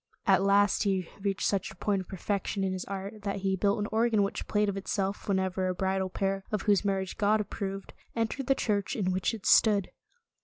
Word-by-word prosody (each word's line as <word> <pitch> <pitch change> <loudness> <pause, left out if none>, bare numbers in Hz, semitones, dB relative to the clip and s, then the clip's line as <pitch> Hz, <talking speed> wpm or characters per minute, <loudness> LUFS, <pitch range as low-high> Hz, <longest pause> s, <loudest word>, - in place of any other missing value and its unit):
At - - +5
last, 200 0 +3
he 190 -4 0
reached 195 -1 -1
such 195 -1 0
a 205 - -12
point 195 +1 0
of 185 - -11
perfection 200 +1 -2
in 190 -1 0
his 185 - -4
art, 200 +2 -6
that 200 -1 -3
he 190 0 +1
built 200 +2 +1
an 205 -1 -1
organ 220 -1 +3
which 200 - -3
played 210 0 +2
of 200 - -1
itself 195 0 -2
whene'er 190 -1 0
a 185 - -1
bridal 190 0 0
pair, 195 +1 -1
of 210 -2 -1
whose 205 -2 +3
mar 195 -1 +1
riage 190 - -6
God 210 +1 +3
approved, 195 -1 -5 0.2
entered 230 +3 -2
the 270 - +4
church 205 -5 -1
in 185 -4 0
which 185 0 0
it 210 - -11
stood. 205 -4 +4
195 Hz, 220 wpm, -29 LUFS, 190-205 Hz, 0.2 s, At